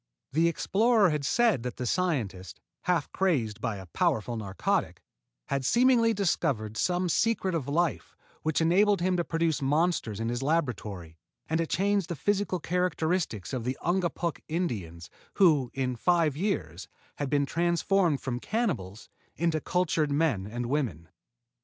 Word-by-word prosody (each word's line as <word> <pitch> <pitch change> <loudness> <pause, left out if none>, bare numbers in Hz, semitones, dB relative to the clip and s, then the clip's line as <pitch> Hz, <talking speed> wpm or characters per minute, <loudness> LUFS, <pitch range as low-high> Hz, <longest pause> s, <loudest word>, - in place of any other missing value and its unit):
The 160 +4 +3
explorer 205 +3 +3
had 150 -1 -2
said 225 - +2
that 125 0 -5
the 125 - -4
scientist, 115 - -2 0.3
half 175 -5 0
crazed 130 - 0
by 115 -4 -1
a 95 -1 -8
powerful 110 +6 0
narcotic, 100 -3 -2 0.5
had 140 -1 -1
seemingly 235 - +4
discovered 155 - 0
some 180 +7 0
secret 195 +1 +1
of 155 -6 -2
life 165 +3 -1 0.3
which 155 +1 0
enabled 195 +4 +3
him 185 +1 +1
to 175 - +1
produce 165 -2 0
monsters 145 - 0
in 115 0 -1
his 120 +1 -2
laboratory 110 - -2 0.3
and 160 +1 0
to 165 - 0
change 200 +1 +1
the 170 - -4
physical 200 +3 0
characteristics 165 - -1
of 125 -3 -2
the 125 +2 -2
Ungapuk 175 -1 0
Indians, 100 - -4 0.2
who, 155 -10 +4
in 130 -2 -2
five 165 +1 +2
years, 95 - -3 0.3
had 145 -2 -2
been 145 0 +2
transformed 170 0 +1
from 125 -2 -3
cannibals 125 - -2 0.3
into 165 -1 0
cultured 160 -3 0
men 140 -10 +1
and 120 +3 -4
women. 120 - -2
155 Hz, 145 wpm, -28 LUFS, 120-180 Hz, 0.5 s, seemingly